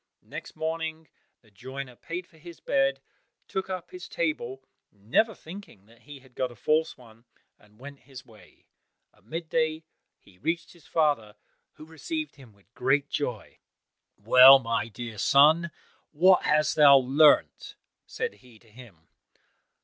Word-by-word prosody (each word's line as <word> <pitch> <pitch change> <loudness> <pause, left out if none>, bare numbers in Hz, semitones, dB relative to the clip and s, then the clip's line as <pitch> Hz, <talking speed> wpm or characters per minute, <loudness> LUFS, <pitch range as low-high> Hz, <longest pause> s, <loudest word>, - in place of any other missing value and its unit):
Next - - -10
morning, 160 -1 -5 0.3
the 110 - -25
joiner 130 +4 -9
paid 175 +8 -7
for 160 -2 -24
his 170 0 -13
bed, 135 0 0 0.5
took 190 0 -4
up 185 -2 -6
his 180 0 -10
table, 135 -5 -3 0.3
never 120 - 0
thinking 165 - -13
that 115 +2 -23
he 145 0 -13
had 130 -1 -22
got 130 0 -3
a - - -14
false 155 +8 0
one, 115 -1 -19 0.3
and 105 0 -25
went 140 +1 -11
his 135 -2 -11
way. 110 -2 -21 0.5
At - - -29
mid 165 +7 -6
day 160 0 -1 0.3
he 90 -2 -24
reached 165 +3 -3
his 170 -3 -21
father, 145 -10 0 0.4
who 155 - -14
received 305 - -6
him 130 -5 -16
with 100 +2 -30
great 135 +3 0
joy. 125 -7 -5 0.6
"Well, 130 +6 +8
my 115 -4 -2
dear 115 0 -9
son, 155 - +4 0.4
what 180 +4 +3
hast 150 +1 +1
thou 145 -2 +8
learnt?" 140 +3 +2 0.3
said - - -4
he 120 -3 -19
to 110 0 -25
him. 105 -9 -16
140 Hz, 150 wpm, -26 LUFS, 120-160 Hz, 0.6 s, Well